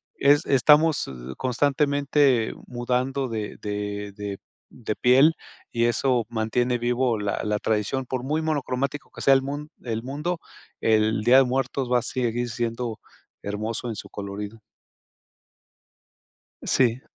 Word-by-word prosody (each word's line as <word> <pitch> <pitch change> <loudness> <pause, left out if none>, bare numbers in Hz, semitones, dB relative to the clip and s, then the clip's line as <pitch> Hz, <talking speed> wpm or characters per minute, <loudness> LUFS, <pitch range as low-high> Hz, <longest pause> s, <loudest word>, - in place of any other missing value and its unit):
es 145 +1 +4
estamos 150 - +4 0.3
constantemente 140 -1 +2
mudando 125 +2 -1
de 110 -3 -4
de 105 0 -4
de 100 -1 -5 0.3
de 110 -3 -5
piel, 135 +6 +5 0.4
y 115 -1 +1
eso 120 0 +1
mantiene 120 +2 0
vivo 120 -1 +1
la 105 -1 -2
la 105 -1 0
tradición. 110 +5 -1
Por 130 -1 -3
muy 155 +4 0
monocromático 140 -2 -2
que - - -10
sea 135 - +6
el 135 - +2
mun 145 +2 -5
el 115 -2 -3
mundo, 150 +7 -3 0.4
el 110 -1 +2
Día 125 +3 +6
de 135 - +7
Muertos 130 0 -1
va 125 - +5
a - - -5
seguir 120 -1 -2
siendo 115 0 -3 0.4
hermoso 110 +4 -3
en 110 - -4
su - - -8
colorido. 100 +2 -6 2.0
Sí. 125 -1 +2
125 Hz, 135 wpm, -25 LUFS, 110-135 Hz, 2.0 s, de